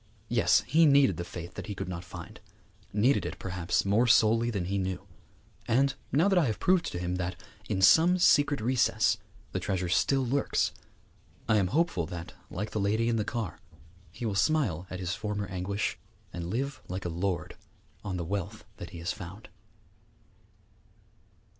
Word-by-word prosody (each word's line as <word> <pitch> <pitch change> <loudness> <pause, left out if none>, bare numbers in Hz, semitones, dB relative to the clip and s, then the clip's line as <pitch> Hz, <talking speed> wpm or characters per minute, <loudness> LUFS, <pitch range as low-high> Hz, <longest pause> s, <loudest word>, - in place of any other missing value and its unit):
Yes, - - +4
he 160 +1 +5
needed 140 -1 +5
the 85 - -3
faith 85 0 -8
that - - -7
he 105 - -4
could - - -5
not 90 -1 -5
find; 90 - -10 0.5
needed 115 +7 +3
it, - - -5
perhaps, 90 -1 -1
more 105 +5 +3
sorely 115 0 +4
than 100 -6 -2
he 100 +2 -1
knew. 95 0 -3 0.6
And 135 +4 +3 0.2
now 160 +8 +4
that 195 -3 +4
I 165 - +3
have 110 - -2
proved 185 -1 +3
to - - -4
him 90 +1 -2
that, 90 0 -3 0.3
in 95 -3 0
some 170 - +6
secret 145 -6 +4
recess, 125 +2 +2 0.3
the - - -2
treasure 95 -3 -2
still 135 +8 +2
lurks, 135 +3 +1 0.8
I 110 - +4
am 95 -3 +2
hopeful 95 - +1
that, 85 -1 -7 0.2
like 105 +4 -4
the 110 - -2
lady 110 +4 +1
in 115 - +1
the 105 - +1
car, 110 -7 -4 0.5
he 120 - -6
will 110 - -1
smile 100 - +1
at 95 - -6
his 90 -1 -2
former 105 -1 -3
anguish, 95 +2 -3 0.3
and 85 0 -5
live 135 +7 -3
like 90 +1 -5
a - - -1
lord 85 -1 -2 0.5
on 95 -2 -3
the 85 - -3
wealth 95 +1 -4
that - - -7
he 85 - -10
has 85 +1 -2
found. 95 +5 -9
100 Hz, 180 wpm, -29 LUFS, 90-120 Hz, 0.8 s, some